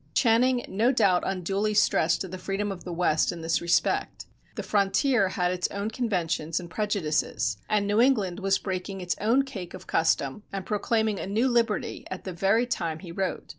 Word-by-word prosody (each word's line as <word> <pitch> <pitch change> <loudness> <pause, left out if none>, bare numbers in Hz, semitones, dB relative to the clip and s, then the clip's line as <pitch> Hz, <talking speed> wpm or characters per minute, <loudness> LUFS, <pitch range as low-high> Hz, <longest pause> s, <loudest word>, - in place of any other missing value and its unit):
Channing 245 +1 +3
no 225 +6 +2
doubt 200 -8 +3
unduly 195 +3 -1
stressed 170 -2 +2
the 185 - -5
freedom 195 +2 -2
of 190 - -7
the 180 - -6
West 165 -2 +1
in 170 - -7
this 165 0 0
respect. 170 0 0 0.3
The - - -4
frontier 200 +2 +2
had 180 -1 0
its 180 -1 -1
own 200 +2 -3
conventions 170 -9 -1
and 170 -1 -9
prejudices, 155 - -1
and 210 -1 +2
New 205 +3 +2
England 210 -9 +2
was 195 -1 +2
breaking 190 0 -4
its 180 -1 -2
own 235 +6 +3
cake 205 -11 -7
of - - -11
custom 160 0 0
and 195 -1 -5
proclaiming 215 -1 0
a - - -4
new 220 +6 +1
liberty 235 -4 0
at 185 - -6
the 185 - -5
very 195 +7 +2
time 170 -10 -2
he 170 0 -10
wrote. 190 +2 -3
195 Hz, 185 wpm, -27 LUFS, 180-220 Hz, 0.3 s, Channing